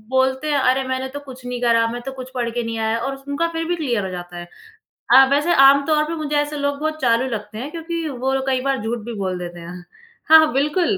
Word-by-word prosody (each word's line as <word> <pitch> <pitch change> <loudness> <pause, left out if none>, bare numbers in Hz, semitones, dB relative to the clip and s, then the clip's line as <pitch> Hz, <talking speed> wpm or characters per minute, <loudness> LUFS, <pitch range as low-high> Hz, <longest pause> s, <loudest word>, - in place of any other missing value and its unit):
बोलते 265 +2 +1
हैं 290 - +2
अरे! 260 +1 +2
मैंने 260 0 -2
तो 285 - -7
कुछ 260 -3 -12
नहीं 245 0 -4
करा, 230 -1 +3
मैं 240 +1 -5
तो 270 - -4
कुछ 260 -1 -9
पढ़ 240 -1 -1
के 240 +1 -3
नहीं 230 0 -4
आया 220 +1 0
और 270 +3 -3
उस 270 - -16
उनका 290 +4 0
फ़िर 330 0 -2
भी 350 - 0
क्लियर 245 - -1
हो 190 - -4
जाता 175 -1 -8
है। 175 - -8 0.6
हाँ, 265 0 +8
वैसे 295 +5 +2
आम-तौर 280 +3 +5
पे 325 - -4
मुझे 300 -2 -2
ऐसे 295 +1 0
लोग 285 0 -1
बहुत 310 +1 -3
चालू 240 0 +2
लगते 215 -2 -6
हैं 270 +6 -5
क्योंकि 330 0 -4
वो 265 0 -1
कई 260 -1 +1
बार 270 -2 0
झूठ 230 +2 -2
भी 235 - -6
बोल 185 -2 -2
देते 175 -1 -7
हैं। 175 +1 -9 0.5
हाँ, 320 - +11
हाँ, 315 -1 +3
बिल्कुल 300 +8 +1
265 Hz, 255 wpm, -20 LUFS, 235-290 Hz, 0.6 s, हाँ